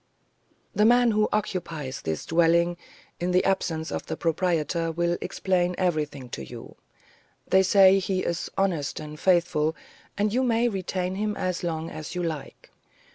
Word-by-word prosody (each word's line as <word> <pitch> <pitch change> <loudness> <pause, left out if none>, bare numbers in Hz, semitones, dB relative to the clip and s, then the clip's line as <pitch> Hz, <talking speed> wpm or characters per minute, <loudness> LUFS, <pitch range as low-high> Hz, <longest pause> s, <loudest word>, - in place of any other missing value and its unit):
The 210 - +2
man 240 +1 +5
who 215 0 +2
occupies 165 -10 -3
this 80 -1 -3
dwelling 170 +1 +3 0.4
in 175 - -1
the 180 0 +3
absence 165 -4 -1
of - - -4
the 160 - -4
proprietor 165 -1 0
will 170 +1 0
explain 180 -1 0
everything 150 -7 -1
to 70 - -6
you; - - -10 0.7
they 190 - +5
say 195 0 +6
he 185 0 -1
is 170 -1 -2
honest 175 -7 0
and 150 0 -8
faithful, 170 -4 +2 0.4
and 205 +1 +1
you 255 - +2
may 240 -1 +2
retain 185 -3 -2
him 210 +1 -1
there - - -5
as 185 -1 -2
long 165 -1 -3
as 155 +1 -7
you 180 - -1
like. 160 -4 -6
175 Hz, 160 wpm, -26 LUFS, 160-190 Hz, 0.7 s, say